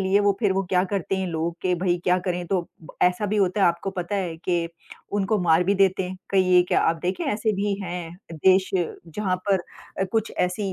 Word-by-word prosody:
लिए 190 +1 +3
वो 205 0 +3
फ़िर 205 -4 +3
वो 195 0 0
क्या 180 -1 +3
करते 195 0 -2
हैं 190 0 -1
लोग 165 0 -2
कि 180 -1 +2
भई 175 0 +1
क्या 180 0 +3
करें? 180 -1 -2
तो 180 -2 -1 0.4
ऐसा 180 +4 +2
भी 210 +1 -1
होता 195 0 +1
है - - +6
आपको 170 +3 0
पता 180 +1 -4
है 175 -4 -2
कि 170 0 -1 0.5
उनको 205 +2 +1
मार 165 0 +4
भी 200 +3 +2
देते 190 -1 +2
हैं। 185 - -6
कहीं 185 -2 +3
ये 180 0 +7
क्या - - +3
आप 165 - +2
देखें 180 +1 -1
ऐसे 215 +1 0
भी 200 +1 0
हैं 175 -1 -6
देश 185 +4 +3
जहाँ 185 +2 -2
पर 190 -3 +3 0.4
अ, - - +3
कुछ 225 -1 0
ऐसी 190 +2 0
185 Hz, 225 wpm, -24 LUFS, 175-195 Hz, 0.5 s, ये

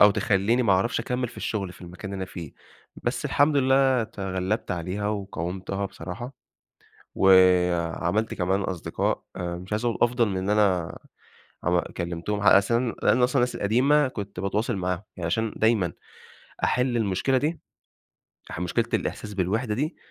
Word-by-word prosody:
أو 105 - +9
تخليني 105 +3 +2
ما 110 -5 +3
أعرفش 95 +6 +1
أكمل 125 +1 -2
في - - -14
الشغل 100 -4 -3
في - - -17
المكان 90 +3 -8
اللي - - -4
أنا 95 - -6
فيه، 85 -5 -8 0.5
بس - - -1
الحمد 145 +1 +3
لله 130 -2 +3
تغلبت 95 -1 -3
عليها 90 +4 -2
وقاومتها 95 -1 -3
بصراحة، 95 +9 -7 0.8
وعملت 90 +1 +3
كمان 95 +2 0
أصدقاء، 95 -3 -2
مش 90 +2 -4
عايزة 110 +3 0
أقول 115 - -3
أفضل 120 -1 +3
من 95 0 -2
أنا 95 -5 +2 0.7
عم 90 0 +3
كلمتهم، 85 +4 -4
علي 100 -1 +7
أس 100 +4 -1
لأن 120 +1 +2
أصلًا 125 +2 +2
الناس 125 0 0
القديمة 135 +7 +3
كنت 100 -6 -6
باتواصل 105 +4 -1
معاهم، 90 0 -2
يعني 90 -3 -4
عشان 110 +5 0
دايمًا 110 -6 +2 0.7
أحل 125 -1 +1
المشكلة 110 +4 +1
دي، 155 +5 -2 0.9
أح 80 - -5
مشكلة 90 -1 0
الإحساس 105 -1 -3
بالوحدة 105 +5 0
دي، 150 +9 -2
100 Hz, 150 wpm, -25 LUFS, 90-120 Hz, 0.9 s, أو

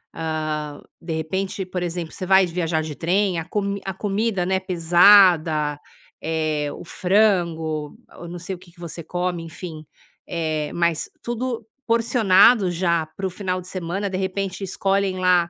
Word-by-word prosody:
hã, 155 -2 -3 0.2
de 165 -1 -4
repente, 190 +5 -2
por 180 -1 -4
exemplo, 170 -1 -4
você 185 - -5
vai 190 0 +5
viajar 165 -2 -1
de 155 -2 -6
trem 185 +1 +1
a 160 - -5
comi 200 -1 -2
a 190 - -3
comida, 200 0 -1
né, 190 0 +1
pesada, 170 -4 +5 0.5
eh, 155 -2 -1
o - - -9
frango, 170 -6 +1 0.2
eu 175 - -8
não 175 +1 -7
sei 185 +2 -5
o - - -12
que 180 -2 -17
que 170 - -23
você 170 -1 -7
come, 175 0 -2
enfim. 160 -1 -8 0.4
Eh, 155 -3 -2
mas 170 -2 0
tudo 240 0 -3 0.2
porcionado 225 -3 +4
já 170 -2 +1
para 190 +5 -5
o - - -3
final 185 -1 -3
de 180 - -13
semana 190 +2 -3
de 185 - -3
repente 190 +1 -3
escolhem 195 0 0
lá 180 -2 +3
180 Hz, 165 wpm, -22 LUFS, 165-195 Hz, 0.5 s, vai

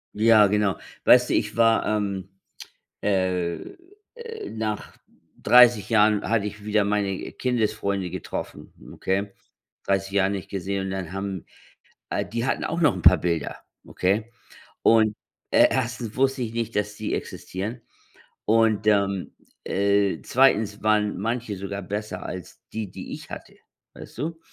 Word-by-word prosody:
Ja, 110 -1 +6
genau. 105 -1 +1 0.3
Weißt - - +6
du, - - +1
ich - - -1
war, 115 -1 +4
ähm, 100 -3 -2 0.7
äh, 90 -3 0 0.6
äh 460 -2 -8
nach 110 -1 -4 0.5
30 120 -4 +6
Jahren 105 -1 +3
hatte 110 -2 +1
ich 105 0 -7
wieder 105 -1 +2
meine 100 -2 -1
Kindesfreunde 100 -6 -1
getroffen. - - -6 0.2
Okay? 100 +1 -2 0.5
30 95 0 0
Jahre 95 -1 +2
nicht 100 -2 -4
gesehen. 95 0 -3
Und 95 - -4
dann 95 -2 -4
haben 95 -2 -4 0.7
äh, - - -1
die 115 +2 -3
hatten - - -1
auch 170 +2 -2
noch 145 - +5
'n 90 - -5
paar 90 +3 +7
Bilder. 85 -3 -2 0.3
Okay? 105 +5 0 0.5
Und, 110 -2 +4 0.4
e - - +7
1. 125 -3 -2
wusste 135 0 +1
ich 115 -2 -3
nicht, 115 -1 -3
dass 105 0 -1
die 110 0 -4
existieren. 110 +6 -5 0.6
Und, 110 -1 +3
ähm, 100 -2 +1 0.3
äh, 100 0 +1
2. 110 -6 +2
waren 105 -2 +2
manche 115 +1 -2
sogar 100 +1 -5
besser 100 0 -5
als 90 -2 -8
die, 110 -4 -4
die - - -8
ich - - -9
hatte. - - -9 0.4
Weißt - - -12
du? 160 +5 -4
105 Hz, 145 wpm, -24 LUFS, 95-115 Hz, 0.7 s, paar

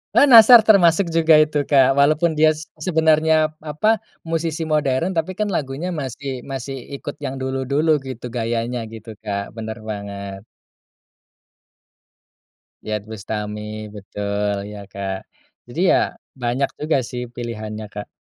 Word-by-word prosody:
Eee, - - +7
Nassar 230 -3 +9
termasuk 195 -3 +5
juga 165 -1 +5
itu, 150 -1 +3
Kak. 135 -2 +5
Walaupun 155 +4 +3
dia 155 0 +4
seb 155 - -11
sebenarnya, 160 -1 +3
apa, 170 +9 +1 0.2
musisi 165 0 -2
modern 155 +2 0
tapi 185 +2 -2
kan 210 - 0
lagunya 145 +6 -3
masih 130 0 -5
masih 135 0 -5 0.2
ikut 145 - -7
yang 135 -2 -4
dulu-dulu 140 +4 +1
gitu 130 -3 -8
gayanya 120 +1 -2
gitu, 110 0 -10
Kak, 100 -2 -4
bener 110 0 -6
banget. 100 -2 -6 2.4
Iyeth 105 -1 -3
Bustami, 105 0 -5
betul 100 0 -3 0.2
ya, 105 - -8
Kak. 95 -1 -5 0.4
Jadi - - -7
ya - - +2 0.3
banyak 125 +3 0
juga 155 -1 +1
sih 125 +1 -5
pilihannya, 110 -3 -6
Kak. 105 - -7
135 Hz, 130 wpm, -21 LUFS, 110-155 Hz, 2.4 s, Nassar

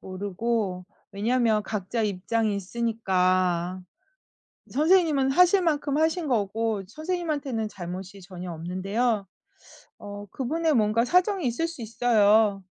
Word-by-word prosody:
모르고. 195 0 -3 0.3
왜냐하면 220 +1 +1
각자 210 +2 -3
입장이 210 +2 -1
있으니까. 185 -4 0 0.9
선생님은 305 -3 +3
하실 360 +4 +5
만큼 295 -3 0
하신 320 0 +1
거고 220 -2 -1
선생님한테는 300 - -3
잘못이 190 +1 -8
전혀 180 -1 -8
없는데요. 195 +6 -1 0.7
어 205 0 -8
그분의 310 +4 0
뭔가 220 0 +2
사정이 365 - +2
있을 250 +8 0
수 330 -7 -9
있어요 215 -3 +3
225 Hz, 275 characters per minute, -26 LUFS, 195-275 Hz, 0.9 s, 하실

